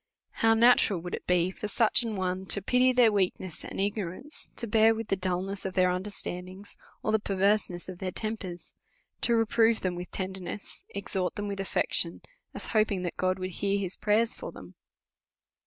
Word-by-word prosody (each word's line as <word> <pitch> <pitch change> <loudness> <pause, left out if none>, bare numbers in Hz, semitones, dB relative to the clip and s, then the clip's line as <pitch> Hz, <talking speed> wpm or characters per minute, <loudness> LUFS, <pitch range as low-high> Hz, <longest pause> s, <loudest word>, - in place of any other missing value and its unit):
How 225 0 +3
natural 225 -5 +5
would 175 +1 -6
it - - -5
be 180 0 +3
for 210 - -5
such 225 +3 +3
a 230 - -2
one 185 -1 -2
to 200 - +3
pity 250 +4 +4
their 245 -3 +5
weakness 185 -3 -1
and - - -7
igno 200 -2 0
rance, 270 - -9
to - - 0
bear 225 +1 +4
with 225 -1 -5
the - - +3
dulness 185 +1 -2
of 190 -1 -4
their 185 -1 +4
understandings, 185 0 -6 0.3
or - - +1
the 220 - +3
pervcrseness 195 -3 +1
of 185 -1 -8
their 190 - -2
tempers; 195 -4 -5 0.5
to 235 - +3
reprove 225 0 +3
them 185 -1 -1
with 175 0 -6
tenderness, 190 +1 -6
exhort 190 -2 -2
them 205 -1 -3
with 200 -1 -4
affection, 195 - 0 0.3
as - - -5
hoping 215 -4 +2
that 175 - -3
God 185 0 0
would 185 0 -4
hear 200 +3 0
his 190 -2 -1
prayers 220 +2 +2
for - - -7
them - - -12
195 Hz, 190 wpm, -29 LUFS, 185-220 Hz, 0.5 s, natural